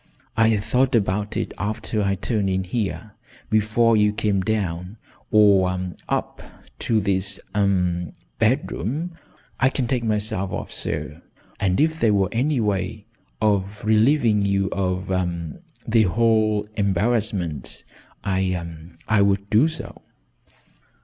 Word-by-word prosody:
I 110 Hz, 0 st, +4 dB
thought 125 Hz, +5 st, +1 dB
about 105 Hz, -1 st, 0 dB
it -, -, -3 dB
after 105 Hz, +1 st, -2 dB
I 100 Hz, -1 st, +1 dB
turned 100 Hz, 0 st, -1 dB
in 95 Hz, 0 st, 0 dB
here 105 Hz, +2 st, -3 dB, 0.4 s
before 110 Hz, +2 st, +3 dB
you 105 Hz, -1 st, +4 dB
came 105 Hz, -2 st, 0 dB
down 95 Hz, -1 st, -2 dB, 0.3 s
or 95 Hz, -3 st, +3 dB, 0.2 s
up -, -, -2 dB, 0.4 s
to 115 Hz, -2 st, +1 dB
this 100 Hz, -1 st, 0 dB
ahem 90 Hz, -4 st, +1 dB, 0.3 s
bedroom. 155 Hz, -, -1 dB, 0.4 s
I 135 Hz, -, +4 dB
can 130 Hz, -1 st, -2 dB
take 125 Hz, -1 st, -1 dB
myself 105 Hz, -3 st, -1 dB
off, 105 Hz, -, -5 dB
sir. -, -, -4 dB, 0.4 s
And 95 Hz, -3 st, +1 dB
if 160 Hz, +2 st, +2 dB
there 110 Hz, -3 st, +3 dB
were 95 Hz, -1 st, +2 dB
any 130 Hz, +4 st, +1 dB
way 105 Hz, 0 st, -2 dB, 0.3 s
of 105 Hz, -1 st, 0 dB
relieving 110 Hz, -1 st, +3 dB
you 100 Hz, -1 st, +1 dB
of 95 Hz, -1 st, -2 dB, 0.8 s
the 115 Hz, 0 st, +4 dB
whole 110 Hz, +1 st, +2 dB
embarrassment, 100 Hz, -, -1 dB, 0.4 s
I 90 Hz, -4 st, -2 dB, 0.2 s
I 110 Hz, -2 st, +3 dB
would 100 Hz, 0 st, +1 dB
do 115 Hz, +8 st, +5 dB
so." 160 Hz, -1 st, -8 dB
105 Hz, 125 wpm, -23 LUFS, 95-110 Hz, 0.8 s, do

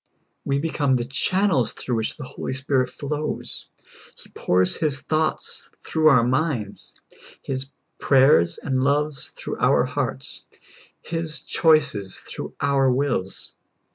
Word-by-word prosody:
We 140 Hz, 0 st, 0 dB
become 145 Hz, -3 st, +1 dB
the 120 Hz, -1 st, -1 dB
channels 150 Hz, -, +1 dB
through 120 Hz, -2 st, -3 dB
wdiich 110 Hz, -, -4 dB
the 150 Hz, -, -7 dB
Holy 130 Hz, -, -5 dB
Spirit 130 Hz, -1 st, 0 dB
flows; 150 Hz, +3 st, -4 dB, 0.5 s
He -, -, -14 dB
pours 90 Hz, 0 st, +2 dB
His 145 Hz, -4 st, 0 dB
thoughts 155 Hz, +2 st, -2 dB
through 160 Hz, -1 st, +2 dB
our 125 Hz, -5 st, +5 dB
minds. 125 Hz, -5 st, -2 dB, 0.5 s
His 135 Hz, 0 st, -3 dB, 0.3 s
prayers 130 Hz, -, +4 dB
and 130 Hz, -2 st, -1 dB
loves 145 Hz, 0 st, +1 dB
through -, -, -7 dB
our -, -, +3 dB
hearts. 65 Hz, -, -2 dB, 0.6 s
His 160 Hz, -3 st, -2 dB
choices 140 Hz, -, +2 dB
through -, -, -8 dB
our 135 Hz, -2 st, +3 dB
wills. 125 Hz, -8 st, -1 dB
135 Hz, 125 wpm, -23 LUFS, 125-150 Hz, 0.6 s, our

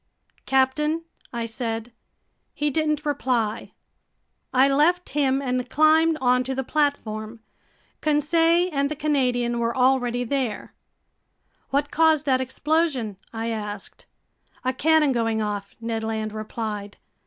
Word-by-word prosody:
"Captain?" 300 Hz, +5 st, +2 dB, 0.3 s
I 235 Hz, -1 st, -3 dB
said. 225 Hz, 0 st, -4 dB, 0.6 s
He 295 Hz, 0 st, 0 dB
didn't 305 Hz, 0 st, 0 dB
reply. 250 Hz, -7 st, -1 dB, 0.8 s
I 260 Hz, +1 st, +5 dB
left 315 Hz, +6 st, +2 dB
him 275 Hz, -1 st, +1 dB
and 250 Hz, -1 st, -1 dB
climbed 315 Hz, +2 st, +4 dB
onto 250 Hz, 0 st, +2 dB
the 265 Hz, -, -1 dB
platform. 235 Hz, -7 st, -1 dB, 0.6 s
Conseil 330 Hz, +4 st, +3 dB
and 280 Hz, 0 st, +1 dB
the 305 Hz, -, -3 dB
Canadian 250 Hz, -5 st, 0 dB
were 235 Hz, +1 st, -1 dB
already 250 Hz, -1 st, +2 dB
there. 245 Hz, -3 st, -3 dB, 1.0 s
"What 285 Hz, +1 st, 0 dB
caused 320 Hz, -2 st, +3 dB
that 260 Hz, -2 st, +2 dB
explosion?" 265 Hz, -, 0 dB
I 225 Hz, 0 st, -3 dB
asked. 210 Hz, -3 st, -6 dB, 0.6 s
"A 255 Hz, -, +1 dB
cannon 310 Hz, +2 st, +3 dB
going 225 Hz, -3 st, 0 dB
off," 205 Hz, -2 st, -3 dB
Ned 225 Hz, -1 st, -3 dB
Land 220 Hz, -1 st, -3 dB
replied. 215 Hz, -1 st, -5 dB
260 Hz, 120 wpm, -24 LUFS, 230-300 Hz, 1.0 s, I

